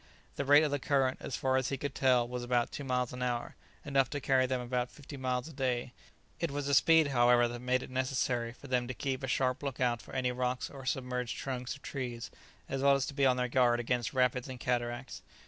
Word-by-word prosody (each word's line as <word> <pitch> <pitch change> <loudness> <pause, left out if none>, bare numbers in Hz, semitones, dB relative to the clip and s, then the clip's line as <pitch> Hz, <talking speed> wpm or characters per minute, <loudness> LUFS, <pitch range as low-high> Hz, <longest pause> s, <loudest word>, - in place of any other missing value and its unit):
The 140 - -2
rate 145 +2 +7
of 150 - 0
the 145 - 0
current, 135 -1 +1
as - - -4
far 130 0 +1
as 130 -1 0
he 135 - -2
could 140 0 -4
tell, 125 -3 +3
was 125 0 -4
about 120 -1 +1
two 145 - -6
miles 125 -2 -1
an 125 - -6
hour, 120 -1 -2 0.3
enough 135 -3 +2
to 145 - -3
carry 130 -2 +2
them 130 0 -1
about 125 0 -2
fifty 145 0 -11
miles 130 -1 -2
a 160 - -10
day; 125 -2 -1 0.5
it 170 - 0
was 140 0 -3
a 140 - +1
speed, 160 +2 +5
however, 120 -2 +4
that 120 0 -6
made 125 +1 0
it - - -10
necessary 130 -2 0
for 130 - -15
them 125 -2 0
to 130 - -5
keep 135 -1 -2
a 130 - -3
sharp 130 0 0
look 140 -3 -4
out 120 -2 +1
for - - -11
any 125 -1 +1
rocks 125 0 -2
or 135 -2 -9
submerged 125 -1 -2
trunks 130 -1 -4
of 140 - -17
trees, 120 -4 -5 0.4
as 135 - -3
well 140 0 +5
as 135 -1 0
to - - -6
be 140 -1 +3
on 125 -1 +3
their 125 0 0
guard 120 -1 +3
against 120 0 -1
rapids 125 -1 +1
and 130 -1 -7
cataracts. 120 +1 -2
130 Hz, 245 wpm, -32 LUFS, 125-135 Hz, 0.5 s, rate